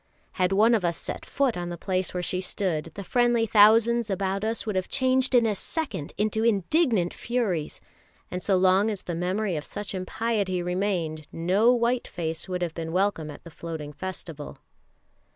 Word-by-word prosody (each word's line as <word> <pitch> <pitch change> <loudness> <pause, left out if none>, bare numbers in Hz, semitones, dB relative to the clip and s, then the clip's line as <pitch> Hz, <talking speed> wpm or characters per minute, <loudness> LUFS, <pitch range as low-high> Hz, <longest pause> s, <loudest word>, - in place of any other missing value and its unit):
Had 185 0 0
one 215 +4 +5
of 215 -5 +2
us 170 -1 0
set - - -6
foot 270 -4 +1
on 175 -1 -4
the 175 - -5
place 185 +1 -1
where 180 -1 -3
she 185 +1 -1
stood, 180 -4 -2
the 200 - -5
friendly 240 +2 +2
thousands 225 +2 +5
about 195 0 -1
us 225 +1 -2
would 215 -3 -2
have 185 -1 -1
changed 260 0 +2
in 240 -2 +5
a 220 - +2
second 200 - -4
into 215 +1 0
indignant 225 - +2
furies, 215 -11 -2 0.5
and 180 - -3
so 195 +1 +2
long 190 +3 +4
as 205 -3 -4
the 175 - -4
memory 185 +3 -1
of 150 - -3
such 205 +4 -6
impiety 190 -1 -1
remained 175 -4 -2
no 190 +8 +3
white 240 0 +1
face 165 +1 -4
would 180 -1 -2
have 170 -2 -2
been 165 -1 -5
welcome 180 -4 0
at 145 - -10
the 170 - -11
Floating 155 -3 -6
Festival. 165 -3 -7
190 Hz, 185 wpm, -26 LUFS, 175-225 Hz, 0.5 s, one